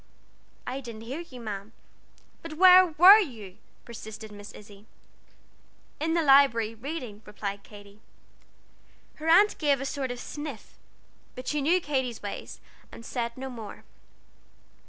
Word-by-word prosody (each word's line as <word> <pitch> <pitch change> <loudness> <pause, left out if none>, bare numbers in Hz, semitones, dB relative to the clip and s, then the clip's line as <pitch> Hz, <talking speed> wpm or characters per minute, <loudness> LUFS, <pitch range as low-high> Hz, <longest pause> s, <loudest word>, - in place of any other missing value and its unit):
"I 255 +2 -4
didn't 230 -4 -9
hear 255 +7 -6
you, 310 -8 -10
ma'am." 210 -1 -7 0.7
"But 330 -2 -8
where 370 +2 +8
were 360 +6 +8
you?" 220 - -6 0.3
persisted 220 -2 -9
Miss 205 0 -11
Izzie. 205 0 -15 1.1
"In 325 +2 -1
the 335 - +2
Library, 270 -6 +4
reading," 240 -3 -7
replied 200 -1 -6
Katy. 205 0 -15 1.2
Her 310 - -7
aunt 400 +6 +5
gave 285 -3 +2
a 275 - -4
sort 270 -1 -3
of 245 0 -5
sniff, 295 -4 -8 0.6
but 255 0 -9
she 300 -1 -1
knew 335 +6 +3
Katy's 260 -8 -3
ways, 205 - -7 0.3
and 230 - -12
said 235 -1 -4
no 265 +1 -6
more. 230 -5 -9
250 Hz, 135 wpm, -27 LUFS, 215-300 Hz, 1.2 s, where